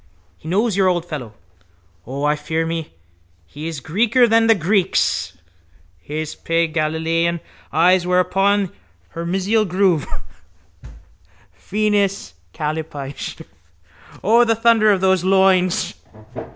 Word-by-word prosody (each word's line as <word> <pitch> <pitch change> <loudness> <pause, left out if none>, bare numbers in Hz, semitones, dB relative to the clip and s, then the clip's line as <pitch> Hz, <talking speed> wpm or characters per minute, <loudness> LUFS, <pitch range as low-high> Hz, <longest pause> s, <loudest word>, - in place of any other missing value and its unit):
He - - -12
knows 210 +3 +1
your 195 -1 +3
old 175 -2 0
fellow. 125 -10 -7 0.7
O, 135 +3 -5
I 150 0 +2
fear 160 +2 -2
me, 165 - -5 0.5
he 150 - -8
is 165 -3 -5
Greeker 225 - +2
than 225 0 +3
the 225 - +5
Greeks. 185 - 0 0.6
His 155 - -5
pale 165 -1 -1
Galilean 165 +2 0 0.3
eyes 175 +3 +3
were 180 0 +3
upon 195 +1 +1 0.4
her 170 0 -6
mesial 195 +5 +1
groove. 185 -5 +1 1.5
Venus 205 - -1 0.2
Kallipyge. 150 - -5 0.8
O, 230 +4 +5
the 225 -1 +2
thunder 225 -1 +4
of 195 -2 +1
those 190 -2 +2
loins! 190 -1 +2
180 Hz, 115 wpm, -20 LUFS, 160-200 Hz, 1.5 s, the